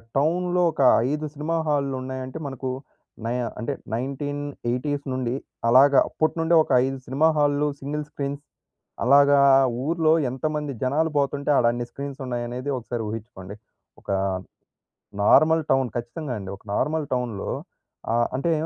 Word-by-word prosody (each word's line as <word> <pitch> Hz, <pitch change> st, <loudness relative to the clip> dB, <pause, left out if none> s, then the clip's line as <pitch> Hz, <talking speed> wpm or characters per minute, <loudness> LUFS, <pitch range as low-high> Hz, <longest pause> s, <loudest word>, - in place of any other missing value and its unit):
టౌనులో 175 Hz, +5 st, +1 dB
ఒక, -, -, -3 dB, 0.3 s
5 150 Hz, +2 st, -2 dB
సినిమా 155 Hz, +3 st, -2 dB
హాలులున్నాయంటే 130 Hz, -2 st, -2 dB
మనకు 135 Hz, -1 st, -5 dB, 0.6 s
నై 115 Hz, -, -1 dB, 0.3 s
అంటే 115 Hz, -, -2 dB, 0.2 s
1980స్ 140 Hz, +1 st, -3 dB
నుండి, 125 Hz, -2 st, -1 dB, 0.3 s
అలాగా 135 Hz, +3 st, +6 dB
అప్పటి 155 Hz, +1 st, 0 dB
నుండే 165 Hz, +1 st, +3 dB
ఒక -, -, -8 dB
5 135 Hz, 0 st, -3 dB
సినిమా 140 Hz, +5 st, +2 dB
హాల్లు 145 Hz, 0 st, +2 dB
సింగిల్ 150 Hz, +2 st, -3 dB
స్క్రీన్స్. 140 Hz, 0 st, -5 dB, 0.6 s
అలాగా 140 Hz, +2 st, +6 dB, 0.5 s
ఊర్లో 160 Hz, -1 st, +3 dB, 0.2 s
ఎంతమంది 150 Hz, +2 st, -3 dB
జనాలు 150 Hz, +5 st, +1 dB
పోతుంటే, 140 Hz, +1 st, 0 dB
ఆడన్ని 120 Hz, 0 st, +2 dB
స్క్రీన్స్ 140 Hz, 0 st, -7 dB
ఉన్నాయనేది 125 Hz, +2 st, -4 dB
ఒకసారి 120 Hz, -1 st, -4 dB
ఊహించుకోండి. 105 Hz, -3 st, -7 dB, 0.5 s
ఒక -, -, -6 dB, 1.1 s
నార్మల్ 160 Hz, +8 st, +5 dB
టౌన్ 135 Hz, -2 st, +2 dB
ఖచ్చితంగా 125 Hz, +4 st, -4 dB
అండి. 95 Hz, -1 st, -7 dB
ఒక -, -, -27 dB
నార్మల్ 150 Hz, +1 st, 0 dB
టౌన్‌లో 125 Hz, -5 st, -2 dB, 0.6 s
ఆహ్, 120 Hz, 0 st, +2 dB
అంటే, 165 Hz, +5 st, 0 dB
140 Hz, 125 wpm, -24 LUFS, 125-150 Hz, 1.1 s, అలాగా